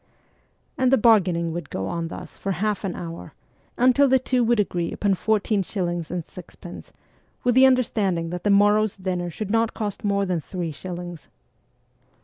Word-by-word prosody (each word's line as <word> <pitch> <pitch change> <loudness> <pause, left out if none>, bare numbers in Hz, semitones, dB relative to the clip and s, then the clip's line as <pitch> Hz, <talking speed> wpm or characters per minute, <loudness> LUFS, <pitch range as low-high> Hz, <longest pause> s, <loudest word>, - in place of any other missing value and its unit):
And 260 -1 +3
the 270 - +6
bargaining 180 -7 +3
would 170 -3 -6
go 95 - -3
on 165 - -3
thus - - -9
for 195 - -3
half 210 +2 -1
an 190 -3 -3
hour, 170 -1 -8 0.4
until 255 +3 +4
the 265 0 +5
two 255 -1 0
would 235 -1 +2
agree 175 -4 -1
upon 200 -2 0
fourteen 210 +1 +1
shillings 175 -3 -3
and 175 -2 -4
sixpence, 175 0 -11 0.5
with 245 - +3
the 260 +2 +7
understanding 200 -10 +1
that 180 0 -5
the 205 - +1
morrow's 205 +1 +3
dinner 180 -2 -3
should 200 +4 -5
not 225 0 +1
cost 210 -3 -4
more 200 -1 +1
than 180 -3 -1
three 175 0 -5
shillings. 175 0 -8
195 Hz, 170 wpm, -24 LUFS, 175-220 Hz, 0.5 s, the